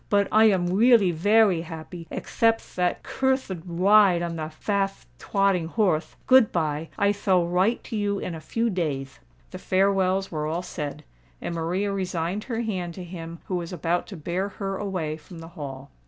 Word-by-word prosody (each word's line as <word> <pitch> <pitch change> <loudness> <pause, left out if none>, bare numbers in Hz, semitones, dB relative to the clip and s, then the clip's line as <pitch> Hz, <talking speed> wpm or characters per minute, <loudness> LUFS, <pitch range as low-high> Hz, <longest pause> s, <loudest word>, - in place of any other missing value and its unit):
"But 200 -1 +3
I 220 +1 +6
am 190 -5 +3
weally 205 +1 +5
veway 205 +1 +4
happy—ekthepth 170 +7 -2
that 180 -1 0
curthed 260 -10 -1
wide 185 0 +4
on 170 -1 -3
the 155 -1 -4
fatht 195 +4 -2
twotting 195 -4 +1
horth. 180 -6 0
Good 260 -4 +6
bye: 155 -1 -1
I 200 -1 +3
thall 190 -3 +2
wite 185 +7 +1
to - - -6
you 205 -1 0
in 180 - -4
a 160 - -7
few 230 +8 -1
dayth." 140 -7 -3 0.3
The 185 - -7
farewells 190 0 +1
were 155 -2 -2
all 165 +3 -2
said; 150 -5 -5 0.4
and - - -4
Maria 180 +5 -1
resigned 185 +1 -2
her 235 -2 -2
hand 185 -7 -3
to 185 - -7
him 170 -1 -8
who 185 - -2
was 170 0 -5
about 175 -1 -1
to 195 - -8
bear 175 +5 -2
her 195 -1 -4
away 180 -7 -3
from 160 +3 -13
the 165 0 -9
Hall. 140 -5 -8
180 Hz, 175 wpm, -25 LUFS, 165-200 Hz, 0.4 s, I